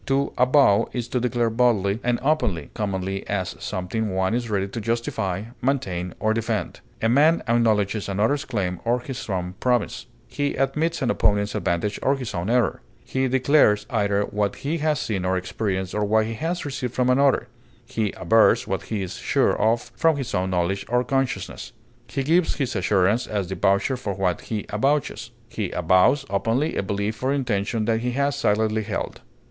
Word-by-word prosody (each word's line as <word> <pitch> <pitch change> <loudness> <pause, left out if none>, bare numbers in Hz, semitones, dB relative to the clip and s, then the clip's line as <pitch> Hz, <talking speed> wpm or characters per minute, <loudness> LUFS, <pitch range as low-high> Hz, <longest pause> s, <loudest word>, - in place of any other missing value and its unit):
To 140 +1 +1
avow 125 -5 +4
is 120 -1 -3
to 125 - 0
declare 120 -1 0
boldly 110 -4 +2
and 120 -1 +1
openly, 120 - 0
commonly 95 -2 -3
as 95 -2 -2
something 105 +3 -3
one 95 +2 +1
is 120 -1 -1
ready 100 -2 0
to 110 +4 -5
justify, 105 -4 -2 0.2
maintain, 95 -10 -1
or 110 0 +2
defend. 115 0 -2 0.2
A - - +4
man 150 +8 +4
acknowledges 110 -3 +1
another's 110 +9 +1
claim 95 -8 -2
or 120 +1 +1
his 130 -2 -7
own 90 -2 -2
promise; 125 -1 0 0.2
he 145 0 -2
admits 150 +4 0
an 125 - +2
opponent's 100 0 +1
advantage 85 +5 -1
or 135 - +2
his 130 -6 -5
own 90 +2 -2
error; 120 -3 +1 0.2
he 130 0 0
declares 130 -5 +3
either 100 -3 +1
what 105 0 -1
he 160 +4 0
has 150 -2 +1
seen 100 -5 -2
or 95 0 +1
experienced 95 0 -3
or 105 - 0
what 110 +1 +2
he 115 - -4
has 165 +9 -3
received 130 -4 -4
from 125 -1 +2
another; 140 +1 +3 0.4
he 110 -3 -1
avers 115 -1 +4
what - - -1
he 105 -3 -1
is 90 - -6
sure - - +2
of 115 +2 +1
from 165 -2 +3
his 135 -3 -4
own 95 -1 0
knowledge 95 +2 0
or 125 +1 +2
consciousness; 135 -1 -2 0.3
he 135 - -2
gives 165 +4 +2
his 130 -4 -2
assurance 100 +4 +2
as 100 -4 -2
the 95 - -3
voucher 100 +9 +2
for 105 -6 -4
what 90 -3 0
he 110 -2 -4
avouches; 135 +1 0 0.2
he 105 -5 -3
avows 95 - +3
openly 115 +9 0
a - - +1
belief 100 +2 -3
or 130 +1 +1
intention 115 -5 -1
that 110 0 +1
he 125 +1 -2
has 140 +2 +1
silently 110 -4 +1
held. 110 0 -4
110 Hz, 180 wpm, -24 LUFS, 100-130 Hz, 0.4 s, avow